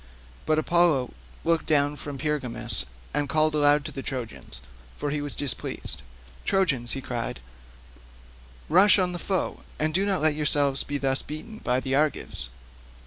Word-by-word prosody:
But 155 - +3
Apollo 155 -5 +2 0.3
looked 165 0 +1
down 145 -1 +3
from 145 0 -7
Pergamus 135 - -1 0.3
and 145 -1 0
called 155 +1 +2
aloud 145 -1 +4
to - - -5
the 135 - -6
Trojans, 125 -5 -6 0.4
for 145 - -2
he 150 0 -1
was 145 -1 -3
displeased. 140 -4 0 0.4
"Trojans," 145 -12 +1
he 135 - -4
cried, 120 - -4 1.3
"rush 190 +7 +6
on 185 -2 +2
the 175 - -3
foe, 190 +1 -1 0.2
and 155 +1 0
do 190 +4 +2
not 200 -2 +1
let 155 -1 +4
yourselves 145 -2 +3
be 145 - -3
thus 135 -1 +1
beaten 215 +9 -8
by 125 +1 0
the 130 0 -3
Argives. 145 - 0
150 Hz, 155 wpm, -26 LUFS, 135-155 Hz, 1.3 s, rush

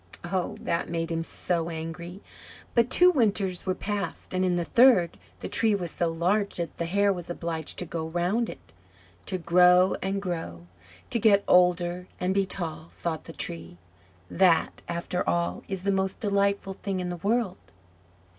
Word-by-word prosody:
Oh, 175 0 -2
that 170 - -1
made 165 0 -2
him 165 0 -1
so 170 0 -1
angry! 170 +3 -7 0.5
But 235 0 +3
two 360 +5 +6
winters 200 - 0
were 185 - +1
past, 200 -3 -4
and 185 0 +1
in 180 -1 +2
the 175 -1 -1
third 230 -6 +5 0.3
the - - -4
tree 220 -2 +2
was 175 -5 -4
so 170 - 0
large 185 +5 0
that 170 -1 -4
the 170 - -1
hare 200 +3 +2
was 175 -2 -8
obliged 165 -2 -4
to 180 - -3
go 160 -1 -4
round 180 +8 0
it. - - -12 0.5
"To 190 - -2
grow 180 +1 +5
and 195 +1 -1
grow, 165 - -5 0.5
to 235 - +1
get 200 -2 +5
older 180 0 +3
and 180 +1 0
be 195 -1 +1
tall," 165 -3 -5
thought 160 -2 -3
the - - -8
Tree 85 - -4 0.5
"that, 170 - +2
after 170 +1 -2
all, 85 +1 0
is 190 -2 -4
the 200 - +1
most 190 0 -1
delightful 200 -2 0
thing 195 -1 -4
in 180 -1 -3
the 175 - -4
world!" 205 +1 0
180 Hz, 175 wpm, -27 LUFS, 170-200 Hz, 0.5 s, two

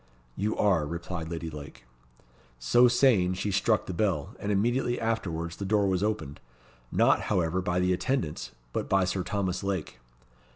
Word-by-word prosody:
"You 105 +2 -1
are," 90 -7 +3
replied 85 0 -5
Lady 85 -1 -5
Lake. 75 -3 -10 0.7
So 120 - +5
saying, 120 -7 +3
she 100 +2 -2
struck 105 +3 +2
the 95 - -5
bell, 90 -6 -1
and 100 - -2
immediately 120 +4 +1
afterwards 85 -7 -2
the - - -5
door 100 +1 +2
was 95 -1 +1
opened; 100 -10 -2 0.5
not, - - +4
however, 90 +1 +1
by 90 0 0
the 90 0 +2
attendants, 85 - -2 0.2
but - - -2
by 95 -1 +3
Sir 90 +1 -1
Thomas 95 -1 -2
Lake. 95 -9 -3
95 Hz, 160 wpm, -28 LUFS, 85-105 Hz, 0.7 s, So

